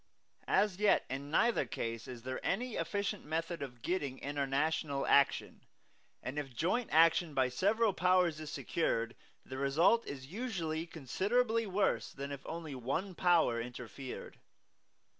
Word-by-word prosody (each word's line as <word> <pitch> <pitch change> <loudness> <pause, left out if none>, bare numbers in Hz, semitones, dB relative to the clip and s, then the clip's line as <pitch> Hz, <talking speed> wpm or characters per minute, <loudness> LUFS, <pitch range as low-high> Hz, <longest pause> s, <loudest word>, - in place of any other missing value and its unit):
As 205 -3 +2
yet 210 -1 +4
in 140 +2 -4
neither 230 +4 +3
case 115 0 -4
is 120 -2 -8
there 130 0 -4
any 240 +5 -1
efficient 200 0 -2
method 165 +2 -3
of 125 -4 -7
getting 145 -8 -1
international 140 +1 -1
action; 140 0 +3 0.6
and 140 +3 -3
if 135 -4 -6
joint 200 - 0
action 165 -1 +4
by 130 -1 +3
several 205 - +2
powers 180 -3 +3
is 155 -1 -6
secured, 115 -8 -1 0.3
the 130 0 -6
result 160 +12 +3
is 130 -2 -6
usually 170 - -3
considerably 220 - 0
worse 195 +1 +1
than 140 +1 -6
if 140 -1 -6
only 165 -3 -5
one 135 +10 -2
Power 165 -10 +3
interfered. 125 +2 -8
155 Hz, 140 wpm, -34 LUFS, 135-185 Hz, 0.6 s, yet